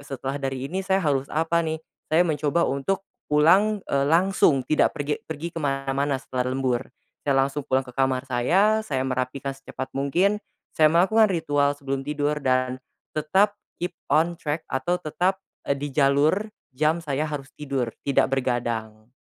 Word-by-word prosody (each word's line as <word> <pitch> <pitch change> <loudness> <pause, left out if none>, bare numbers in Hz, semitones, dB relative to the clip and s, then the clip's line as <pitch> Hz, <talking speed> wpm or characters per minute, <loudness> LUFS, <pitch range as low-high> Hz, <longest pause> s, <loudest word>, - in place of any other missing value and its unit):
setelah 140 0 -5
dari 135 -1 -3
ini 185 +7 -3
saya 190 -1 0
harus 140 -2 +1
apa 165 +2 +1
nih, 160 -1 -1 0.3
saya 165 +3 +4
mencoba 155 +1 +1
untuk 185 +9 -1 0.2
pulang, 190 +8 +4
eee, 140 0 0
langsung 165 -6 +3
tidak 155 - +2
pergi 145 +1 -2
pergi 160 +2 -5
ke 165 - -5
mana-mana 135 0 0
setelah 130 -1 -3
lembur, 130 -1 -1 0.3
saya 140 -2 +1
langsung 140 0 -5
pulang 130 0 +2
ke 125 - -11
kamar 130 0 0
saya 180 - +2
saya 145 -12 -2
merapikan 130 +1 -2
secepat 135 -1 -7
mungkin, 175 +10 +2 0.4
saya 155 0 +5
melakukan 200 +4 +4
ritual 145 -4 +1
sebelum 135 -1 -4
tidur 150 0 -1
dan 130 -2 +1 0.4
tetap 195 +7 +2 0.2
keep 175 - -3 0.2
on 170 +2 +3
track 155 -1 -2
atau 175 +7 -1
tetap, 180 +4 0 0.2
eee, - - +1
di 145 - -2
jalur 150 +9 +2 0.2
jam 155 +4 +2
saya 150 -2 -2
harus 145 -3 -5
tidur 135 -5 -2 0.2
tidak 140 -2 +3
begadang. 120 -4 -2
145 Hz, 160 wpm, -25 LUFS, 135-170 Hz, 0.4 s, saya